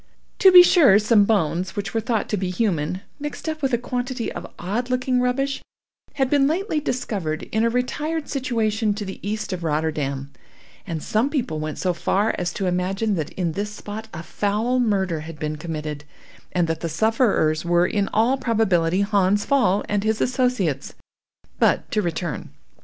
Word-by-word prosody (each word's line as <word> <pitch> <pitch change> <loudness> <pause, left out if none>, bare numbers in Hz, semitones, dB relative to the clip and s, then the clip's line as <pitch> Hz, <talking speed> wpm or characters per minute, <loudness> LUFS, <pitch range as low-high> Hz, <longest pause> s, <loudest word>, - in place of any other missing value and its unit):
To 380 - +8
be 360 -1 +11
sure, 300 - +6
some 215 -1 +4
bones 185 -3 0
which 205 -1 -4
were 225 - 0
thought 225 -1 -1
to - - 0
be 185 -1 -2
human, 180 -3 -1 0.2
mixed 295 +2 -6
up 310 -1 -3
with 270 -1 0
a 240 - +3
quantity 245 0 -3
of - - -8
odd 220 +8 -3
looking 255 0 +1
rubbish, 270 +2 0 0.5
had 270 -2 +2
been 275 0 +3
lately 330 +1 0
discovered 200 - -3
in 220 +1 +1
a 230 - +3
retired 295 +6 -2
situation 225 -5 0
to 210 -1 -5
the 190 - -7
east 210 0 -3
of 175 -2 -5
Rotterdam, 150 -3 -2 0.6
and 165 -4 -4
some 225 +6 +1
people 235 - -2
went 155 0 -4
so 180 -1 0
far 200 +5 +1
as 175 -1 -1
to 195 - -3
imagine 190 +4 0
that 160 -6 -2
in 175 -3 -1
this 205 +5 -3
spot 210 +1 -8
a 165 -1 -7
foul 215 +8 0
murder 190 -8 +1
had 160 0 -8
been 155 0 -3
committed, 150 -2 -5 0.5
and 175 -2 +1
that 165 0 -2
the 170 - -3
sufferers 195 - +2
were 175 0 +3
in 200 +2 0
all 235 +5 +2
probability 190 -7 +2
Hans 200 0 +2
Pfaall 245 -8 +2
and 205 -1 0
his 220 0 0
associates. 245 - 0 0.6
But - - +2
to 215 - +1
return. 170 -3 -3
205 Hz, 180 wpm, -23 LUFS, 175-245 Hz, 0.6 s, be